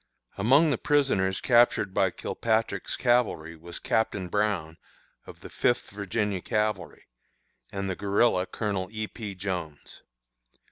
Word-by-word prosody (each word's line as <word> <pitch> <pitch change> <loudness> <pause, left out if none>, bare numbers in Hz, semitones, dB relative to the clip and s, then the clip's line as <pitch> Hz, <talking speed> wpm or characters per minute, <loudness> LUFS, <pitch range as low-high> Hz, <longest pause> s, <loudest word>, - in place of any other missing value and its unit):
"Among 140 +10 +4
the 130 - 0
prisoners 115 -11 +2
captured 120 -5 +3
by 95 - +3
Kilpatrick's 110 +4 -1
cavalry 120 -10 +1
was 85 +2 -9
Captain 100 -5 -1
Brown, 95 -6 -1 0.5
of - - -12
the - - -10
Fifth 120 - 0
Virginia 100 -1 -2
cavalry, 105 -7 -2 0.7
and 100 0 -3
the 95 - -2
guerilla, 100 -1 +2
Colonel 100 -4 -3
E. 110 0 -3
P. 105 -4 -7
Jones. 90 -6 -5
100 Hz, 125 wpm, -27 LUFS, 95-110 Hz, 0.7 s, Among